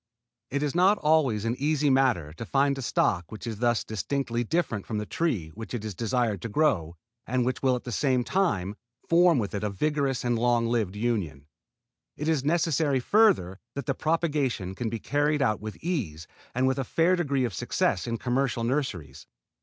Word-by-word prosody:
It 140 Hz, +2 st, -1 dB
is 145 Hz, -, -1 dB
not 185 Hz, +4 st, +4 dB
always 145 Hz, -9 st, +2 dB
an 115 Hz, +1 st, 0 dB
easy 150 Hz, 0 st, +2 dB
matter 125 Hz, -, +2 dB
to 85 Hz, -, -7 dB
find 140 Hz, +3 st, +2 dB
a 135 Hz, -, -5 dB
stock 90 Hz, -8 st, 0 dB
which 110 Hz, -, -8 dB
is 110 Hz, -3 st, -5 dB
thus 120 Hz, -1 st, +2 dB
distinctly 120 Hz, +2 st, -2 dB
different 115 Hz, -, -1 dB
from 110 Hz, -, -3 dB
the 105 Hz, -, -2 dB
tree 110 Hz, -, -1 dB
which 115 Hz, +8 st, -7 dB
it 110 Hz, -2 st, -5 dB
is 110 Hz, -, -4 dB
desired 115 Hz, -2 st, -1 dB
to 115 Hz, -, -4 dB
grow 100 Hz, -, +1 dB, 0.3 s
and 125 Hz, +1 st, +1 dB
which 130 Hz, 0 st, -2 dB
will 130 Hz, -2 st, +3 dB
at 125 Hz, -, -5 dB
the 125 Hz, -, -6 dB
same 130 Hz, +1 st, +1 dB
time 105 Hz, -, 0 dB, 0.3 s
form 170 Hz, -1 st, +5 dB
with 105 Hz, -5 st, -2 dB
it 100 Hz, 0 st, -3 dB
a 105 Hz, -, 0 dB
vigorous 140 Hz, +4 st, -1 dB
and 120 Hz, -2 st, 0 dB
long 120 Hz, 0 st, +2 dB
lived 115 Hz, -5 st, 0 dB
union. 100 Hz, -, -2 dB, 0.7 s
It 150 Hz, -, -3 dB
is 155 Hz, -5 st, +1 dB
necessary 155 Hz, -3 st, +1 dB
further 150 Hz, -, +3 dB, 0.2 s
that 140 Hz, -2 st, -4 dB
the 135 Hz, -, 0 dB
propagation 145 Hz, -, -1 dB
can 115 Hz, +3 st, -3 dB
be 115 Hz, -, -3 dB
carried 145 Hz, +4 st, +1 dB
on 110 Hz, -5 st, +1 dB
with 110 Hz, 0 st, -7 dB
ease 105 Hz, -, -3 dB, 0.3 s
and 130 Hz, +1 st, +2 dB
with 130 Hz, +1 st, +1 dB
a -, -, 0 dB
fair 165 Hz, +8 st, +2 dB
degree 140 Hz, -7 st, 0 dB
of 115 Hz, -, -3 dB
success 90 Hz, +3 st, 0 dB
in 115 Hz, 0 st, -1 dB
commercial 125 Hz, 0 st, 0 dB
nurseries. 115 Hz, -, -3 dB
125 Hz, 195 wpm, -27 LUFS, 110-145 Hz, 0.7 s, form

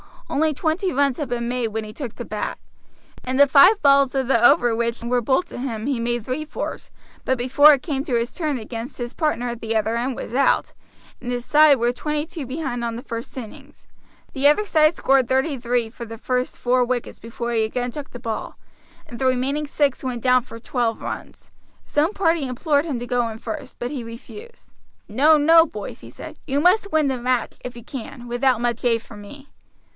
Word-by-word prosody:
Only 310 Hz, +1 st, +2 dB
twenty 330 Hz, +5 st, -1 dB
runs 275 Hz, -2 st, +2 dB
had 295 Hz, -, -3 dB
been 240 Hz, -1 st, -2 dB
made 245 Hz, -1 st, -1 dB
when 220 Hz, 0 st, -4 dB
he 215 Hz, 0 st, -9 dB
took 245 Hz, -3 st, -7 dB
the 240 Hz, -, -6 dB
bat. 210 Hz, -1 st, -4 dB, 0.7 s
In 255 Hz, +1 st, -2 dB
the 285 Hz, +2 st, +7 dB
five 360 Hz, +10 st, +7 dB
balls 275 Hz, -2 st, +4 dB
of 265 Hz, -2 st, 0 dB
the 235 Hz, -3 st, +3 dB
over 240 Hz, -2 st, +5 dB
which 235 Hz, 0 st, -2 dB
were 245 Hz, +1 st, +1 dB
bowled 260 Hz, +9 st, +1 dB
to -, -, -8 dB
him 230 Hz, -4 st, -4 dB
he 270 Hz, -3 st, -1 dB
made 240 Hz, -1 st, -2 dB
three 270 Hz, +5 st, -3 dB
fours; 310 Hz, -, -6 dB, 0.4 s
but 260 Hz, -, +1 dB
before 270 Hz, +5 st, +6 dB
it 270 Hz, -, -1 dB
came 275 Hz, -4 st, -2 dB
to 260 Hz, -7 st, -1 dB
his 235 Hz, +1 st, -1 dB
turn 305 Hz, -6 st, -2 dB
again 230 Hz, +1 st, -6 dB
his 240 Hz, -2 st, -7 dB
partner 275 Hz, -6 st, -1 dB
at 235 Hz, -1 st, -5 dB
the 225 Hz, 0 st, -3 dB
other 220 Hz, +1 st, +1 dB
end 250 Hz, +2 st, -2 dB
was 230 Hz, -, -7 dB
out, 275 Hz, +2 st, +2 dB, 0.5 s
and 245 Hz, -, -5 dB
his 245 Hz, 0 st, -3 dB
side 300 Hz, -2 st, +6 dB
were 240 Hz, 0 st, +1 dB
twenty 300 Hz, +4 st, -3 dB
two 320 Hz, -5 st, -7 dB
behind 260 Hz, -3 st, -4 dB
on 230 Hz, -1 st, -2 dB
the 240 Hz, -, -7 dB
first 230 Hz, +2 st, -7 dB
innings. 275 Hz, +5 st, -10 dB, 0.5 s
The 275 Hz, 0 st, +3 dB
other 300 Hz, +9 st, +4 dB
side 315 Hz, -4 st, +3 dB
scored 270 Hz, -2 st, +3 dB
thirty 265 Hz, +3 st, +1 dB
three 240 Hz, -1 st, -1 dB
for 235 Hz, +1 st, -9 dB
the 225 Hz, 0 st, -9 dB
first 250 Hz, +2 st, -2 dB
four 250 Hz, 0 st, +2 dB
wickets 245 Hz, -1 st, -3 dB
before 235 Hz, +1 st, -5 dB
he 225 Hz, -2 st, +1 dB
again 245 Hz, +3 st, -2 dB
took 290 Hz, +2 st, -7 dB
the -, -, -9 dB
ball, 225 Hz, -2 st, -5 dB, 0.5 s
and 235 Hz, -, -10 dB
the 265 Hz, -, -1 dB
remaining 265 Hz, +4 st, 0 dB
six 285 Hz, -2 st, 0 dB
went 245 Hz, -3 st, -4 dB
down 255 Hz, -1 st, +4 dB
for 230 Hz, -, -11 dB
twelve 235 Hz, -1 st, -2 dB
runs. -, -, -8 dB, 0.3 s
His -, -, -15 dB
own 315 Hz, +7 st, +3 dB
party 330 Hz, -7 st, +1 dB
implored 285 Hz, +4 st, 0 dB
him 280 Hz, -7 st, -3 dB
to 240 Hz, -, -5 dB
go 245 Hz, -1 st, 0 dB
in 220 Hz, -1 st, -6 dB
first, 270 Hz, +3 st, -7 dB
but 245 Hz, +2 st, -3 dB
he 275 Hz, -4 st, -4 dB
refused. 420 Hz, -, -11 dB, 0.4 s
"No, 295 Hz, +9 st, +5 dB
no, 325 Hz, +3 st, +6 dB
boys," 210 Hz, -10 st, -8 dB
he -, -, -12 dB
said; -, -, -10 dB
"you 280 Hz, +1 st, 0 dB
must 395 Hz, +4 st, +3 dB
win 310 Hz, -2 st, +2 dB
the 260 Hz, -, -1 dB
match, 250 Hz, 0 st, -1 dB
if 250 Hz, -1 st, -6 dB
you 235 Hz, -, -10 dB
can, 245 Hz, 0 st, -8 dB
without 245 Hz, 0 st, +1 dB
much 240 Hz, -1 st, -1 dB
aid 230 Hz, -2 st, +2 dB
from 210 Hz, -2 st, -12 dB
me." 275 Hz, +7 st, -13 dB
255 Hz, 220 wpm, -22 LUFS, 235-290 Hz, 0.7 s, the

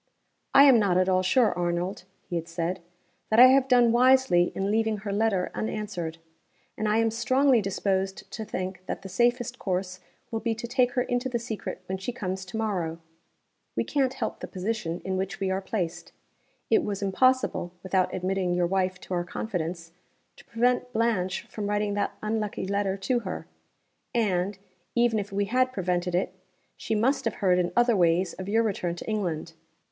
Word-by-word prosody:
"I 275 Hz, -, +10 dB
am 265 Hz, -5 st, +7 dB
not 195 Hz, -4 st, +2 dB
at 185 Hz, 0 st, +3 dB
all 185 Hz, -1 st, +3 dB
sure, 225 Hz, +5 st, +3 dB
Arnold" 175 Hz, +2 st, -2 dB, 0.2 s
(he 175 Hz, -, -4 dB
had 165 Hz, -1 st, -3 dB
said), 170 Hz, +2 st, -3 dB, 0.5 s
"that 220 Hz, -, +4 dB
I 255 Hz, +1 st, +10 dB
have 265 Hz, 0 st, +4 dB
done 245 Hz, -3 st, +5 dB
wisely 250 Hz, -7 st, +4 dB
in 195 Hz, +1 st, -1 dB
leaving 220 Hz, 0 st, +1 dB
her 200 Hz, 0 st, -4 dB
letter 205 Hz, -3 st, +1 dB
unanswered. 200 Hz, -7 st, -4 dB, 0.6 s
And 215 Hz, -, -2 dB
I 215 Hz, -, +3 dB
am 225 Hz, 0 st, +2 dB
strongly 255 Hz, +2 st, +3 dB
disposed 195 Hz, 0 st, -2 dB
to 220 Hz, -, -5 dB
think 185 Hz, -3 st, -5 dB
that -, -, -4 dB
the 195 Hz, -, -7 dB
safest 240 Hz, +4 st, +1 dB
course 185 Hz, -1 st, -2 dB, 0.3 s
will 225 Hz, -, -1 dB
be 225 Hz, 0 st, -1 dB
to 235 Hz, +2 st, -6 dB
take 245 Hz, 0 st, +1 dB
her 250 Hz, -, +1 dB
into 245 Hz, +1 st, -1 dB
the 245 Hz, -, 0 dB
secret 220 Hz, -5 st, -6 dB
when 190 Hz, +1 st, -4 dB
she 195 Hz, +6 st, -3 dB
comes 190 Hz, -6 st, -4 dB
to 185 Hz, +4 st, -6 dB
morrow. 180 Hz, -7 st, -1 dB, 0.8 s
We -, -, +1 dB
can't 265 Hz, -2 st, 0 dB
help -, -, -3 dB
the -, -, -6 dB
position 185 Hz, -3 st, -3 dB
in 190 Hz, 0 st, -1 dB
which 190 Hz, 0 st, -3 dB
we 190 Hz, -1 st, 0 dB
are 190 Hz, +1 st, -1 dB
placed. 175 Hz, -4 st, -4 dB, 0.6 s
It 420 Hz, -6 st, +4 dB
was 200 Hz, -1 st, -3 dB
impossible 255 Hz, -2 st, +2 dB
(without 185 Hz, -1 st, +1 dB
admitting 185 Hz, -1 st, -1 dB
your 175 Hz, 0 st, +2 dB
wife 185 Hz, 0 st, 0 dB
to -, -, -6 dB
our 175 Hz, -1 st, 0 dB
confidence) 175 Hz, -3 st, -4 dB, 0.5 s
to -, -, -16 dB
prevent 245 Hz, +2 st, +1 dB
Blanche 220 Hz, -6 st, 0 dB
from 205 Hz, -2 st, -5 dB
writing 205 Hz, 0 st, 0 dB
that 205 Hz, 0 st, -2 dB
unlucky 215 Hz, -3 st, -2 dB
letter 200 Hz, 0 st, -1 dB
to 240 Hz, +6 st, 0 dB
her 190 Hz, -5 st, -6 dB, 0.7 s
and, 200 Hz, -3 st, +1 dB, 0.4 s
even 235 Hz, -2 st, +3 dB
if 200 Hz, -1 st, -5 dB
we 200 Hz, +1 st, 0 dB
had 255 Hz, +4 st, +2 dB
prevented 180 Hz, -5 st, -1 dB
it, 180 Hz, 0 st, 0 dB, 0.4 s
she 220 Hz, -, -2 dB
must 250 Hz, +7 st, +2 dB
have 225 Hz, -, -1 dB
heard 180 Hz, -2 st, +2 dB
in 175 Hz, -1 st, 0 dB
other 240 Hz, -1 st, +4 dB
ways 175 Hz, 0 st, +2 dB
of 185 Hz, +1 st, -7 dB
your 225 Hz, +2 st, +3 dB
return 180 Hz, -5 st, -1 dB
to -, -, -9 dB
England. 175 Hz, -7 st, -2 dB
200 Hz, 185 wpm, -27 LUFS, 185-230 Hz, 0.8 s, I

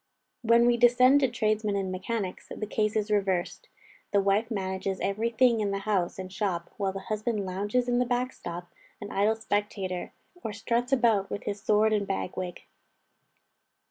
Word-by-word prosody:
When 235 Hz, 0 st, +5 dB
we 240 Hz, 0 st, +4 dB
descend 250 Hz, +3 st, +6 dB
to 270 Hz, -, +3 dB
tradesmen 215 Hz, -3 st, 0 dB
and 195 Hz, -2 st, -1 dB
mechanics, 185 Hz, +1 st, -4 dB
the 215 Hz, -, -4 dB
case 215 Hz, 0 st, 0 dB
is 215 Hz, 0 st, 0 dB
reversed: 195 Hz, -, 0 dB, 0.4 s
the 200 Hz, -, +4 dB
wife 200 Hz, +3 st, +2 dB
manages 190 Hz, -2 st, -2 dB
every 215 Hz, +4 st, 0 dB
thing 235 Hz, 0 st, +3 dB
in 210 Hz, -1 st, 0 dB
the 195 Hz, -, -1 dB
house 195 Hz, -5 st, 0 dB
and 185 Hz, 0 st, -7 dB
shop, 185 Hz, -4 st, -2 dB
while 195 Hz, -2 st, 0 dB
the 195 Hz, 0 st, -6 dB
husband 215 Hz, 0 st, -2 dB
lounges 205 Hz, +7 st, -1 dB
in 245 Hz, 0 st, +2 dB
the 250 Hz, -, +2 dB
back 250 Hz, +1 st, 0 dB
shop 175 Hz, -4 st, -8 dB, 0.3 s
an 205 Hz, -1 st, -7 dB
idle 210 Hz, +3 st, +2 dB
spectator, 205 Hz, -4 st, -3 dB, 0.3 s
or 215 Hz, -, -3 dB
struts 235 Hz, +4 st, -1 dB
about 230 Hz, -7 st, +3 dB
with 205 Hz, -, -4 dB
his 200 Hz, -1 st, -4 dB
sword 215 Hz, +1 st, +3 dB
and 205 Hz, -2 st, 0 dB
bag 190 Hz, -1 st, -3 dB
wig. 180 Hz, -2 st, -5 dB
210 Hz, 175 wpm, -28 LUFS, 195-230 Hz, 0.4 s, descend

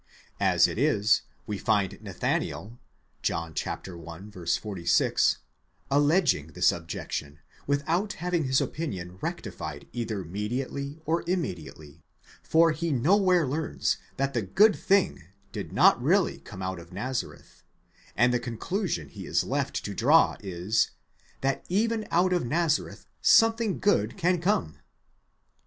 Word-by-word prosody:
As -, -, +4 dB
it -, -, -4 dB
is, 105 Hz, +1 st, +3 dB, 0.2 s
we 105 Hz, -2 st, -4 dB
find 100 Hz, -2 st, 0 dB
Nathanael, 105 Hz, +3 st, -3 dB, 0.4 s
John 85 Hz, -1 st, -2 dB
i. 85 Hz, -3 st, -7 dB, 0.2 s
46, 90 Hz, 0 st, +1 dB, 0.5 s
alleging 145 Hz, -, +3 dB
this 90 Hz, 0 st, +4 dB
objection, 80 Hz, -3 st, -5 dB, 0.3 s
without 165 Hz, +9 st, 0 dB
having 175 Hz, -2 st, -1 dB
his 130 Hz, 0 st, +3 dB
opinion 95 Hz, -, -4 dB
rectified 70 Hz, -2 st, -5 dB
either 110 Hz, -5 st, -3 dB
mediately 125 Hz, -, -4 dB
or 165 Hz, +2 st, 0 dB
immediately, 85 Hz, -, -4 dB, 0.4 s
for 165 Hz, +1 st, +4 dB
he 165 Hz, +2 st, -2 dB
nowhere 180 Hz, -, +3 dB
learns 150 Hz, +4 st, -1 dB, 0.2 s
that 135 Hz, 0 st, 0 dB
the 120 Hz, -, 0 dB
good 205 Hz, -, +4 dB
thing 195 Hz, -, +1 dB, 0.3 s
did -, -, -6 dB
not -, -, +5 dB
really -, -, +2 dB
come 95 Hz, -, -9 dB
out 95 Hz, -1 st, -3 dB
of 85 Hz, +1 st, -13 dB
Nazareth, 125 Hz, +7 st, -5 dB, 0.5 s
and 125 Hz, +2 st, +4 dB
the 125 Hz, -, +2 dB
conclusion 125 Hz, -, -3 dB
he -, -, -9 dB
is -, -, +1 dB
left -, -, -2 dB
to -, -, -4 dB
draw -, -, +4 dB
is, 95 Hz, +3 st, 0 dB, 0.5 s
that 135 Hz, 0 st, 0 dB
even 220 Hz, +3 st, 0 dB
out 180 Hz, +2 st, +3 dB
of 180 Hz, -, +1 dB
Nazareth 155 Hz, +4 st, 0 dB, 0.2 s
something 225 Hz, -2 st, +4 dB
good 205 Hz, 0 st, +1 dB
can 180 Hz, -1 st, +1 dB
come. 165 Hz, -, 0 dB
130 Hz, 125 wpm, -27 LUFS, -, 0.5 s, not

